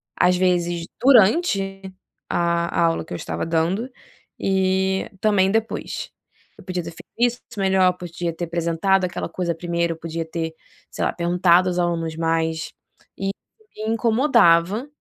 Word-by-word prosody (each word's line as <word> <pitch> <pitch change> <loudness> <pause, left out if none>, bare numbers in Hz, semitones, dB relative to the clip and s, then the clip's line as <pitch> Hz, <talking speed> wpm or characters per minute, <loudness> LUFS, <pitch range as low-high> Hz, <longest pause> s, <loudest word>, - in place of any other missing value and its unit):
às 180 0 +3
vezes, 175 -2 +1 0.2
durante 205 - +4 0.5
a 170 0 0
aula 165 -1 +2
que - - -9
eu - - -3
estava 80 0 -4
dando 170 +9 0 0.5
e 190 0 +1
também 200 -3 +3
depois, 225 +1 -2 0.5
eu - - -14
podia 180 -2 -3
ter 170 - -7
feito - - -13
isso 245 +1 +2 0.2
melhor, 190 -2 +3
podia 170 -1 -4
ter 175 +1 -4
apresentado 170 +3 +1
aquela 175 - -4
coisa 175 -2 -2
primeiro, 170 0 -1
eu - - -13
podia 165 0 -4
ter, 160 0 -4 0.4
sei - - -3
lá, - - 0
perguntado 175 +1 +3
aos 180 - -3
alunos 165 -2 -1
mais, 165 0 -1 0.5
e 195 0 -2 0.5
me 220 +1 -1
incomodava, 225 - +3
180 Hz, 145 wpm, -22 LUFS, 170-195 Hz, 0.5 s, durante